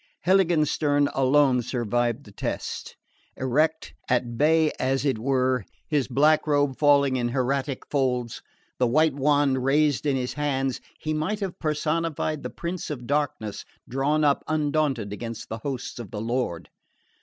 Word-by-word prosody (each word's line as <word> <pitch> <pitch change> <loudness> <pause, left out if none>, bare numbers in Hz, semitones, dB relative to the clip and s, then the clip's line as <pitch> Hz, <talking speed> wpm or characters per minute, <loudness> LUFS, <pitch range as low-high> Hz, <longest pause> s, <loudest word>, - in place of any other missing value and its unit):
Heiligenstern 155 -6 +3
alone 135 -1 +3
survived 120 -1 -1
the - - -14
test. - - -5 0.4
Erect, 150 +5 0 0.2
at 120 -1 0
bay 155 +4 +3
as 135 +2 0
it 130 -6 +1
were, 130 -1 +1 0.3
his 145 -4 +1
black 150 +5 +3
robe 145 -3 +1
falling 140 -3 +4
in 120 -1 0
hieratic 135 +2 -1
folds, 125 -4 -1 0.4
the 125 - +3
white 155 +5 +3
wand 140 -2 +2
raised 150 +2 +2
in 140 - +2
his 125 -1 -2
hands, 135 -3 -1 0.2
he 155 - -2
might 160 +8 -1
have 190 -3 -4
personified 155 0 -1
the - - -5
Prince 170 +1 -5
of 130 -5 -5
Darkness 140 -7 -2 0.2
drawn 145 +4 +1
up 145 -1 +2
undaunted 145 -8 0
against 115 +1 -6
the 110 - -5
hosts 130 0 -5
of 115 -5 -7
the 105 - -5
Lord. 115 - -2
140 Hz, 145 wpm, -25 LUFS, 125-150 Hz, 0.4 s, falling